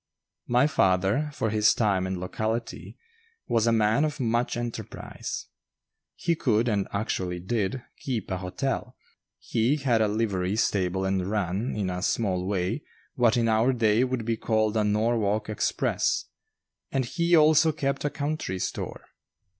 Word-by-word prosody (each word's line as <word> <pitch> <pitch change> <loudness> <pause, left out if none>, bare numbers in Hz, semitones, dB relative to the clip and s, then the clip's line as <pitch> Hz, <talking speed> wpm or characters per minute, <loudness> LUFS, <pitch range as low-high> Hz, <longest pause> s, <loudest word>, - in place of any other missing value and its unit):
My 125 +3 +4
father, 95 +2 +2
for 125 -7 -2
his 105 0 +4
time 100 -5 +1
and 95 -1 -3
locality, 110 +5 -4 0.5
was 115 0 +2
a - - +4
man 110 +4 +3
of 150 -1 -2
much 120 0 0
enterprise. 120 -1 -5 0.7
He 170 - 0
could, 120 -7 +1
and 100 -4 0
actually 95 -4 -2
did, 105 +5 -2 0.2
"keep 120 -9 -3
a 95 - 0
hotel"; 120 +6 -3 0.4
he 115 +6 +1
had 130 -6 +1
a 110 - +3
livery 100 -3 0
stable 95 -4 0
and 95 -1 0
ran, 105 +2 -1
in 100 -3 -1
a 90 0 -4
small 95 -3 0
way, 100 +7 -1 0.3
what 120 -1 +3
in 115 -1 +2
our 110 +3 +3
day 115 -1 +3
would 130 -3 -2
be 115 -1 0
called 110 -1 +1
a 110 - +2
Norwalk 105 0 +1
Express; 110 - 0 0.7
and 135 -2 0
he 170 +5 +2
also 155 +1 +5
kept 140 -2 -2
a 145 - +1
country 145 -10 -3
store. - - -4
110 Hz, 150 wpm, -26 LUFS, 100-125 Hz, 0.7 s, also